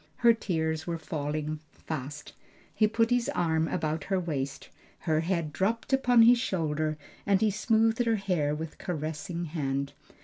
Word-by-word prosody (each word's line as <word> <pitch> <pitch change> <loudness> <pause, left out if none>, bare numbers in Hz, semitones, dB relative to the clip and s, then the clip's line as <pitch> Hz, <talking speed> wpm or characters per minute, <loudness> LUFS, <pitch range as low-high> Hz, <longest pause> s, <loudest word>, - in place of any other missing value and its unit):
Her 235 - +9
tears 160 -6 -2
were 170 -1 -1
falling 155 0 -3
fast. 145 -1 -6 0.4
He 215 - +3
put 225 +2 +1
his 245 +2 +2
arm 160 -1 +1
about 155 -1 -2
her 190 -1 +1
waist, 140 -6 -4 0.3
her 155 -2 +1
head 165 -2 -1
dropped 225 - -1
upon 245 -3 +5
his 240 +1 +7
shoulder 155 -7 -1 0.3
and 200 -1 +3
he 220 -1 +3
smoothed 225 +3 +2
her 230 -1 +3
hair 175 -8 0
with 160 0 -6
caressing 165 +1 -3
hand. 140 -3 -2
165 Hz, 150 wpm, -29 LUFS, 155-215 Hz, 0.4 s, Her